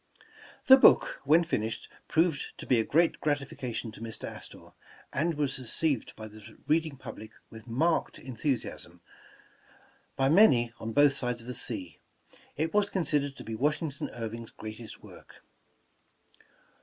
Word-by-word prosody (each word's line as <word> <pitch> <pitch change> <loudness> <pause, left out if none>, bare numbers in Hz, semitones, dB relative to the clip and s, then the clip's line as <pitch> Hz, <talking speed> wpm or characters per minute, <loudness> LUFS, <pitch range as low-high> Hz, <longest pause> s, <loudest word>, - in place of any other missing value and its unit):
The 265 0 +10
book, - - +5
when 160 +5 +5
finished, 115 -9 -2 0.2
proved 160 -2 0
to - - -8
be 125 - +3
a - - +2
great 165 +8 +2
gratifi 145 -3 -1
cation 120 -2 -4
to 110 - -13
Mr. 115 -1 -7
Astor, - - -10 0.4
and 160 +4 0
was 140 -2 -1
received 130 +1 -1
by 110 - -8
the 110 0 -13
reading 155 -2 +1
public 110 -4 -9 0.2
with 110 +1 -11
marked 160 +9 0
enthusiasm. 130 +1 -4 1.1
By 135 - +2
many, 135 - +5
on 110 - -4
both 145 +3 +5
sides 125 -2 -2
of - - -14
the 125 - -5
sea, 100 -8 -2 0.6
it 160 +2 -1
was 205 -1 +3
considered 145 -7 0
to - - -9
be 115 - -6
Washington 145 +4 -1
Irving 115 0 -5
's - - -16
greatest 110 0 -9
work. - - -15
135 Hz, 150 wpm, -29 LUFS, 115-155 Hz, 1.1 s, The